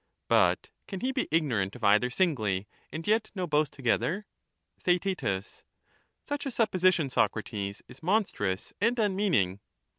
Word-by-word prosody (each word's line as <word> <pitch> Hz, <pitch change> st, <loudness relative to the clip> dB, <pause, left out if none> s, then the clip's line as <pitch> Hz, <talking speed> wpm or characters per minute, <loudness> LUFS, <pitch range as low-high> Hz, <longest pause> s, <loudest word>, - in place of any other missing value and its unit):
But -, -, +3 dB, 0.2 s
can 190 Hz, -3 st, -6 dB
he 260 Hz, -, 0 dB
be -, -, -1 dB
ignorant 125 Hz, -12 st, +1 dB
of 120 Hz, -, -11 dB
either 105 Hz, +5 st, +4 dB
singly 110 Hz, -, 0 dB, 0.2 s
and 160 Hz, +1 st, -5 dB
yet 220 Hz, +1 st, +2 dB
know 185 Hz, -2 st, -1 dB
both 150 Hz, -2 st, +2 dB
together? 135 Hz, -, 0 dB, 0.6 s
Theaet, 180 Hz, 0 st, +1 dB, 1.0 s
Such 290 Hz, -1 st, -4 dB
a -, -, 0 dB
supposition, 185 Hz, -, +2 dB
Socrates, 105 Hz, -4 st, -1 dB
is 130 Hz, -, -13 dB
monstrous 165 Hz, -, 0 dB
and 230 Hz, +3 st, +2 dB
unmeaning. 190 Hz, -, +1 dB
160 Hz, 130 wpm, -29 LUFS, -, 1.0 s, either